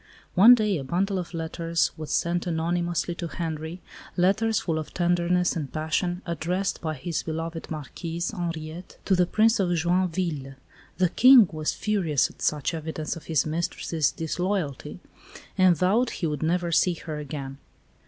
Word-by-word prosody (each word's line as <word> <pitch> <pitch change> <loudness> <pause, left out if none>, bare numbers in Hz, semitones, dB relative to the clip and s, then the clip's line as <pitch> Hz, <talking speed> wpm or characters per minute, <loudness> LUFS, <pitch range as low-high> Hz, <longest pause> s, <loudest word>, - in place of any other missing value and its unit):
One 220 +7 +9
day 210 -7 0
a - - -5
bundle 185 +7 0
of 175 - -6
letters 165 0 -1
was 155 -1 -7
sent 175 +1 0
anonymously 175 +1 -1
to 170 0 -5
Henri, 160 +1 -5 0.4
letters 205 +4 +2
full 160 -3 -1
of 155 - -8
tenderness 175 0 +1
and 150 -5 -4
passion, 175 +4 -1
addressed 180 +3 -2
by 155 -1 -2
his 155 +4 -3
beloved 165 +1 -5
Marquise, 165 +3 -4
Henriette, 170 -2 -6
to 195 - +3
the 180 -1 +3
Prince 220 +4 +3
de 180 -3 +1
Joinville. 170 -5 -1 0.4
The 185 -2 +3
King 250 +1 +7
was 155 -1 -2
furious 175 -10 0
at - - -20
such 150 +2 0
evidence 160 -1 -4
of 165 - -11
his 155 -6 +1
mistress's 160 -1 -1
disloyalty, 165 -3 -3 0.5
and 185 -3 +4
vowed 215 - +2
he 175 - -4
would 150 -3 -2
never 170 +2 0
see 175 +1 +3
her 155 -2 -6
again. 135 -2 -6
170 Hz, 155 wpm, -26 LUFS, 155-180 Hz, 0.5 s, One